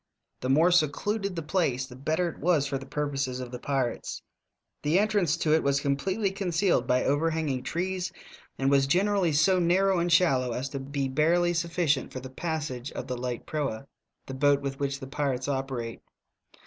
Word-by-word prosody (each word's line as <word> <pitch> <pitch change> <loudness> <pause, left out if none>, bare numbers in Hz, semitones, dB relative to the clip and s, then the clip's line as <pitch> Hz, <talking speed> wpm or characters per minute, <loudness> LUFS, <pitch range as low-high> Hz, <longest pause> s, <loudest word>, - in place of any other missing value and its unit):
The 130 - -3
more 160 +6 +5
seeluded 190 +5 +1
the 165 - -3
plaee 140 -7 0
the 125 - -11
better 155 +7 0
it 170 - -7
was 160 -3 +2
for 135 -1 -2
the 135 - -10
purposes 135 -3 -2
of 125 -1 -6
the 125 - -6
pirates. 130 -3 -2 0.6
The 150 +4 +2
entranee 200 -6 +2
to 155 - +3
it 160 - +4
was 140 0 +1
eompletely 190 +9 0
eoneealed 175 - +1
by 125 0 +2
overhanging 150 -2 0
trees, 180 +5 -2 0.5
and 135 +1 +1
was 135 -1 +4
generally 190 +2 +2
so 180 +6 +4
narrow 185 +2 +3
and 175 +1 0
shallow 135 -8 +3
as 130 +3 -3
to 140 - -5
be 140 0 -2
barely 170 +6 +2
sufficient 165 -4 0
for 130 - -5
the 130 +1 -9
passage 145 -4 -4
of - - -5
the 125 -1 -3
light 125 -1 -4
proa, 140 -6 -3 0.4
the 135 - -7
boat 140 +1 +3
with 135 -1 -4
which 140 -1 -2
the 135 - -7
pirates 135 -1 -2
oper 135 -3 -2
ate. 115 - -8
145 Hz, 185 wpm, -28 LUFS, 135-175 Hz, 0.6 s, more